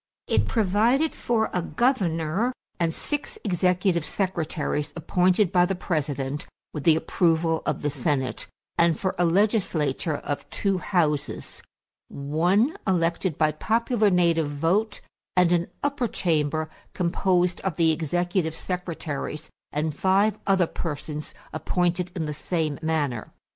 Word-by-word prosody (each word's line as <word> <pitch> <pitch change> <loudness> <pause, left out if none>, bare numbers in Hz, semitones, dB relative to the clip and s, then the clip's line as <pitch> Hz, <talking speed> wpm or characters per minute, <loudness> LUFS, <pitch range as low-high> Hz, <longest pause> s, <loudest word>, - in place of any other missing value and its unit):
It - - +2
provided 230 - +2
for 225 -2 0
a 180 - +1
governor 195 - +1 0.3
and 170 -1 +2
six 290 - -3
executive 180 -2 +1
secretaries 160 -5 -2
appointed 180 +3 +2
by 180 -2 +4
the 195 - -1
President 145 -5 -2 0.3
with 150 - -5
the 165 -2 +6
approval 165 0 +1
of 150 - -1
the 145 - +1
Senate; 135 -1 -1 0.3
and 170 -2 +4
for 190 -1 0
a 175 - +4
legislature 170 - +1
of 145 0 -5
two 190 +7 0
houses 150 -7 -1 0.5
one 175 - +1
elected 170 -2 +1
by 155 -1 +3
popular 220 - +1
native 170 -4 +3
vote, 180 +9 0 0.4
and 180 -1 +5
an 175 0 +2 0.2
upper 280 -4 0
chamber 155 -5 0 0.3
composed 180 0 +1
of 190 -5 -2
the 165 -1 +4
executive 170 +2 0
secretaries 165 -4 -4 0.2
and 150 +1 -1
five 195 +4 +2
other 190 -2 +4
persons 150 -2 -5 0.2
appointed 175 +2 0
in 170 - -1
the 150 -1 -3
same 155 -1 -2
manner. 150 -8 -1
170 Hz, 125 wpm, -25 LUFS, 155-190 Hz, 0.5 s, the